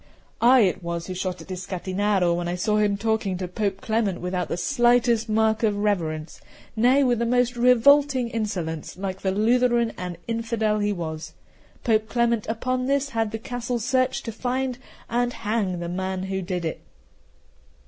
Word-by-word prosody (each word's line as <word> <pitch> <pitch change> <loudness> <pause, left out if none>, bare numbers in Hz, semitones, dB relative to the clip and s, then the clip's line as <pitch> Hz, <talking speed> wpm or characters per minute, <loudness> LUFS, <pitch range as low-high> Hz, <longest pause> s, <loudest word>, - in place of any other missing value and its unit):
I 250 +1 +7
it 190 -3 +1
was 170 -1 -4
who 185 - -5
shot 185 0 -4
at - - -11
Iscatinaro 185 0 0
when 175 0 -2
I 175 - -1
saw 210 +4 +1
him 205 -1 +2
talking 220 -3 -1
to 180 0 -4
Pope 195 +1 -2
Clement 220 -6 0
without 180 -1 -2
the - - -3
slightest 240 -1 +2
mark 220 0 +2
of 210 -3 +1
reverence, 165 -7 -2 0.3
nay, 250 +5 +4
with 245 -3 +2
the 235 - +1
most 245 0 +2
revolting 250 +2 +4
insolence, 180 -10 -4
like 190 0 -4
the 190 - 0
Lutheran 235 +3 +2
and 180 -1 -5
infidel 225 -2 0
he 205 0 +1
was. 160 -4 -5 0.5
Pope 220 -2 +1
Clement 235 -2 +1
upon 255 +3 -1
this 280 0 +1
had 225 -3 -1
the 225 - -4
castle 245 +2 -3
searched 255 +3 0
to 230 - -3
find 250 +2 -2 0.3
and 245 +1 0
hang 210 -5 -1
the 170 0 -4
man 185 +1 -3
who 190 0 -3
did 180 -2 -3
it. 160 - -4
215 Hz, 170 wpm, -24 LUFS, 185-240 Hz, 0.5 s, I